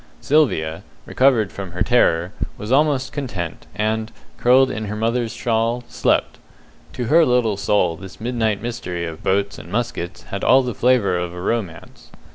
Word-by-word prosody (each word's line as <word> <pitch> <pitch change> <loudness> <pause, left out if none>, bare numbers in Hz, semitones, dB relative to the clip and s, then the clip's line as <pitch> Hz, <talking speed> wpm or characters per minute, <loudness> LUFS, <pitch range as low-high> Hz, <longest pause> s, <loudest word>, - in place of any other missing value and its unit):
Sylvia, 95 - +1 0.2
recovered 125 -7 +2
from 95 -3 -7
her 90 +3 0
terror, 90 -6 +2 0.2
was 110 -1 -6
almost 135 -2 +2
content, 100 - -5
and, 110 +1 -1 0.3
curled 130 +2 +5
in 110 - -4
her 105 +1 -4
mother's 115 +1 -1
shawl, 115 +1 -1
slept. - - 0 0.5
To 125 - -3
her 165 +8 +5
little 125 -6 +2
soul 100 -4 +1
this 95 +2 -11
midnight 110 -3 -1
mystery 100 -8 -4
of 80 -1 -7
boats 100 +1 0
and - - -11
muskets 105 -6 -3
had 100 - -6
all 130 +1 +5
the 125 -1 -3
flavour 110 -6 +2
of 90 0 -4
a - - -7
romance. 90 -4 -4
110 Hz, 160 wpm, -21 LUFS, 95-125 Hz, 0.5 s, curled